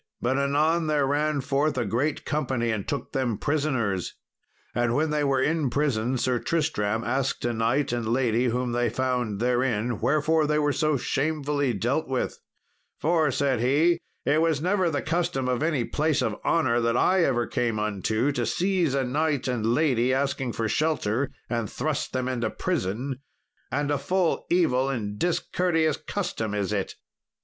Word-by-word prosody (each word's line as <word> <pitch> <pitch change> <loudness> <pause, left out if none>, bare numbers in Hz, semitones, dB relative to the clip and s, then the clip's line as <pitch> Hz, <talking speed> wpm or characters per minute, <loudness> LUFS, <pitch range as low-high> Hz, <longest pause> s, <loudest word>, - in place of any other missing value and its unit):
But 130 +3 0
anon 155 +4 +2
there 150 -2 +2
ran 145 +1 0
forth 140 +2 0
a 120 - 0
great 125 +9 -1
company 130 -6 -1
and 105 -3 -3
took 140 - -3
them 130 -6 -1
prisoners. 130 - -1 0.6
And 120 0 +1
when 155 +2 +1
they 150 -1 +1
were 135 -2 +2
in 155 -3 +1
prison, 130 -3 0
Sir 125 0 0
Tristram 110 -10 0
asked 135 +3 -1
a 120 - 0
knight 115 +5 +1
and 120 -2 -2
lady 120 -1 +2
whom 125 +1 0
they 120 0 +1
found 125 -4 -1
therein 120 -2 0
wherefore 150 +5 +2
they 150 0 +1
were 145 -1 +2
so 155 -1 +1
shamefully 145 -1 0
dealt 125 +10 -1
with; 130 -1 -2 0.6
"for," 160 -1 +2
said 135 -2 +1
he, 150 +8 +3 0.3
"it 155 +2 +3
was 165 -3 +2
never 185 +2 +1
the 145 -4 -2
custom 155 -5 -1
of 125 0 0
any 150 -7 +1
place 155 -1 0
of - - -1
honour 125 -8 +2
that 115 +1 +1
I 185 -1 +3
ever 120 -6 +1
came 115 -3 -1
unto 110 +5 0
to 140 - -1
seize 180 -5 +1
a 135 - +1
knight 145 +1 0
and 125 -4 -1
lady 125 -1 +2
asking 135 -3 -1
shelter 125 0 0 0.2
and 115 -3 -2
thrust 150 +2 -2
them 130 -1 -2
into 120 -3 -1
prison, 130 - -2 0.5
and 145 +1 0
a 145 - +1
full 180 +4 0
evil 135 -7 +2
and 105 -6 -3
discourteous 165 -3 +1
custom 110 - -3
is 100 0 -1
it." 100 -2 -2
135 Hz, 165 wpm, -26 LUFS, 120-155 Hz, 0.6 s, he